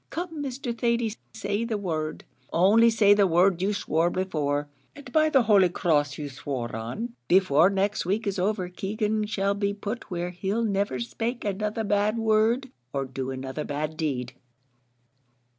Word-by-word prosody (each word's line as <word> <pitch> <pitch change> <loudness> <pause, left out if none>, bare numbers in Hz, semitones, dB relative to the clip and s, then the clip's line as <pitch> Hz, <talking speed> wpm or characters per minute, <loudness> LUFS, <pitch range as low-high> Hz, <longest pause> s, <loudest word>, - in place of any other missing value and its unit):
Come, 330 -3 -4
Mr. 260 -3 -4
Thady, 235 -2 0 0.2
say 205 0 -2
the 230 -2 -2
word 160 -6 -3 0.3
only 210 +7 +5
say 215 -3 +5
the 205 -1 +4
word 180 +1 +3
you 195 +2 +1
swore 170 -4 +1
before, 150 -6 -1 0.3
and 285 -4 -11
by 310 +2 +4
the 270 -5 +4
holy 200 -5 +5
cross 145 -5 +1
you 150 - -4
swore 130 -4 -5
on, 120 - -5
before 180 -2 +5
next 200 +1 0
week 200 +6 -1
is 200 -1 -1
over 190 -1 0
Keegan 210 +3 -2
shall 200 -2 0
be 200 0 -1
put 210 +3 -5
where 175 -1 -3
he'll 195 +5 -2
never 200 - 0
spake 225 - -3
another 210 +2 -2
bad 205 +1 +1
word, 225 +4 +2 0.2
or 135 -1 -2
do 130 0 -5
another 130 +3 -4
bad 150 +2 -3
deed." 130 -6 -2
200 Hz, 160 wpm, -26 LUFS, 155-220 Hz, 0.3 s, only